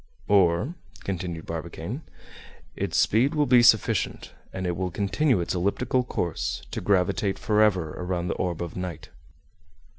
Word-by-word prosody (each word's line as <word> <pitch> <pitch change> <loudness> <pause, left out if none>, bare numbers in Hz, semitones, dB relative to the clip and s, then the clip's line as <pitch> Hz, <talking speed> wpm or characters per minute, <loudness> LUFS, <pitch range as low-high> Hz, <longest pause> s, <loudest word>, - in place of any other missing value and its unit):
"Or," 95 - +3 0.3
continued 85 -3 -4
Barbicane, 85 - -5 0.7
"its - - -2
speed 130 +8 +3
will 150 -1 +3
be 125 -2 +6
sufficient, 115 -3 +2 0.2
and 95 -1 -4
it 90 -1 -1
will 90 +1 -2
continue 100 - +1
its 85 - -2
elliptical 110 +8 0
course, 85 - -3
to - - -4
gravitate 95 +1 +1
forever 105 -7 +2
around 90 -1 -3
the - - 0
orb 85 -2 -2
of 85 - -7
night." 90 -4 -6
95 Hz, 140 wpm, -26 LUFS, 85-110 Hz, 0.7 s, be